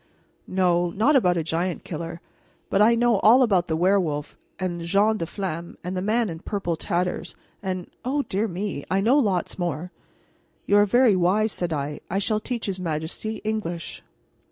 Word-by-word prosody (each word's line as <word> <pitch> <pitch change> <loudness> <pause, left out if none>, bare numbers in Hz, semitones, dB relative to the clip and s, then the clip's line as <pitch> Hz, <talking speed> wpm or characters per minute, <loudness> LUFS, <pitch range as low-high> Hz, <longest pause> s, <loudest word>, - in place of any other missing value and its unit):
No, 175 -2 +2
not 220 - +2
about 180 -9 +4
a 165 - 0
giant 170 +2 -2
killer, 165 +1 -6 0.5
but 195 - +3
I 230 +2 +6
know 235 -3 +3
all 245 +6 +6
about 190 -7 +2
the 160 - 0
werewolf, 175 -5 +1 0.2
and 175 -2 -3
Jeanne 205 +6 +2
la 165 - -2
Flamme, 170 -3 -5
and 180 +2 -4
the 185 - -1
Man 220 +4 +1
in 165 -3 -6
Purple 185 -3 -2
Tatters, 180 +2 -2 0.3
and 185 -2 -3 0.2
O 280 +3 0
dear 205 0 -1
me, 185 -5 -4
I 190 - +2
know 240 +8 +4
lots 195 - 0
more." 175 0 -3 0.7
"You 205 - +4
are 205 0 +5
very 240 0 +5
wise," 195 +5 +2
said 175 -3 -2
I. 145 -1 -3
"I 190 - -1
shall 210 +2 0
teach 235 +1 -4
his 190 -2 -3
majesty, 165 +6 -4
English." 205 -6 -3
185 Hz, 180 wpm, -24 LUFS, 170-215 Hz, 0.7 s, I